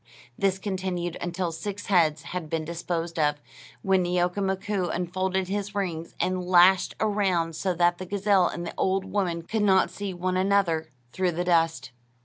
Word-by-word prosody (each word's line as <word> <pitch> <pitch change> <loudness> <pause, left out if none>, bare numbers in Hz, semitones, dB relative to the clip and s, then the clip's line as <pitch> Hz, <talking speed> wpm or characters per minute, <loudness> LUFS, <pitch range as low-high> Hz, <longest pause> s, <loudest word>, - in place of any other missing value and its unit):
This 195 +3 +1
continued 185 -3 -3
until 175 0 -2
six 205 +5 -5
heads 160 -5 +2
had 170 -2 -5
been 160 0 -2
disposed 170 0 -3
of, 150 -1 +2 0.4
when 190 -1 +3
Neeoka 180 +2 0
Mkoo 190 -1 -1
unfolded 185 +1 -1
his 205 +1 -3
rings 170 -5 -3
and 185 0 0
lashed 180 +1 +5
around 190 -6 +1
so 185 +2 -1
that 175 +1 +2
the 185 - -6
gazelle 200 -1 +3
and 175 - -5
the - - -5
old 190 0 +1
woman 175 -5 -1
could 220 +5 -2
not 190 -2 +4
see 200 -1 -5
one 185 +1 -2
another 185 -5 +1 0.2
through 185 -2 0
the 175 +2 -1
dust. 165 -7 +1
180 Hz, 165 wpm, -26 LUFS, 170-190 Hz, 0.4 s, lashed